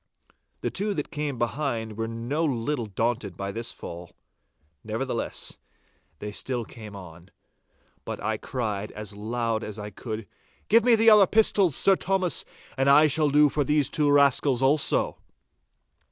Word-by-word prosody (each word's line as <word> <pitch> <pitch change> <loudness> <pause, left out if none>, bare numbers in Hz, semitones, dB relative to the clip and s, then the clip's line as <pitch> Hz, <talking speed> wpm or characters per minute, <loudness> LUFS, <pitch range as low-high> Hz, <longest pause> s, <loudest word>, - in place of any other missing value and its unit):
The - - -2
two 205 +1 -1
that 150 - -4
came 150 -4 -3
behind 120 -3 -2
were 115 +1 -3
no 120 +8 -3
little 130 -3 -1
daunted 110 -2 -2
by 100 0 -4
this 115 +2 -2
fall. 85 +1 -9 0.7
Nevertheless, - - -3 0.6
they 105 - -6
still 120 +2 -2
came 105 -3 -11
on, 90 -1 -12 0.7
but - - -6
I - - -2
cried 105 -5 -4
out - - -15
as 105 -1 -6
loud 115 +1 -2
as 105 0 -6
I 105 0 -7
could, 110 +1 -6 0.4
'Give 230 +1 +5
me 245 -1 +5
the 225 0 +5
other 205 -3 +7
pistols, 200 -7 +3
Sir 195 - +5
Thomas, 190 -2 0 0.3
and 135 +1 +2
I 145 +3 +7
shall 150 0 +2
do 150 +1 +5
for 145 +1 0
these 145 0 +1
two 150 -2 +2
scoundrels 140 -2 +3
also! 140 +2 +2
125 Hz, 155 wpm, -26 LUFS, 110-150 Hz, 0.7 s, other